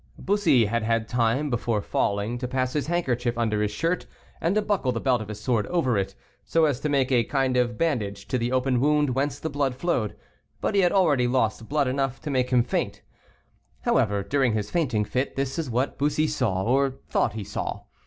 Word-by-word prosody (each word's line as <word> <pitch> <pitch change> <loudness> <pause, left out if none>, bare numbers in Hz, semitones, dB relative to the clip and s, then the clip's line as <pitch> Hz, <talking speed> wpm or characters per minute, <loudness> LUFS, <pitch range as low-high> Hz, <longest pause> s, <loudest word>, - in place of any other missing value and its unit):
Bussy 200 - +3
had 115 +3 0
had 115 0 0
time, 125 +5 +1
before 115 -2 0
falling, 100 +3 -1
to 125 - -3
pass 130 0 -1
his 150 -1 -1
handkerchief 125 -9 0
under 110 -3 0
his 105 - +1
shirt, 165 +12 -1 0.3
and 175 +4 +1
to 215 - +3
buckle 200 -11 0
the 115 - -2
belt 125 -3 +1
of 110 - -6
his 105 -1 -7
sword 110 -1 0
over 160 -9 +1
it, 95 -1 -1 0.3
so 165 -1 +2
as 140 -5 0
to 150 - -2
make 135 -2 +1
a 120 -2 +4
kind 135 0 0
of 120 -2 +1
bandage 115 -12 -1
to 130 - 0
the 120 +1 -1
open 130 -1 +1
wound 150 0 +2
whence 135 +3 -1
the - - -4
blood 140 -3 -1
flowed, 130 - -1 0.4
but - - -1
he 200 - +4
had 175 -2 +3
already 150 -10 +3
lost 115 -3 0
blood 145 -2 +1
enough 135 0 -1
to 150 - -4
make 125 -2 +1
him 125 -2 +4
faint. - - -2 0.8
However, 100 -1 +1
during 130 0 +1
his 105 -1 -2
fainting 130 -11 +1
fit, 130 +5 -2
this 135 +3 -2
is 155 -5 -3
what 125 +4 -1
Bussy 150 +2 +2
saw, 125 -11 0
or 135 +3 +2
thought 110 - +1
he 110 -1 -5
saw. - - -4
130 Hz, 215 wpm, -25 LUFS, 115-145 Hz, 0.8 s, a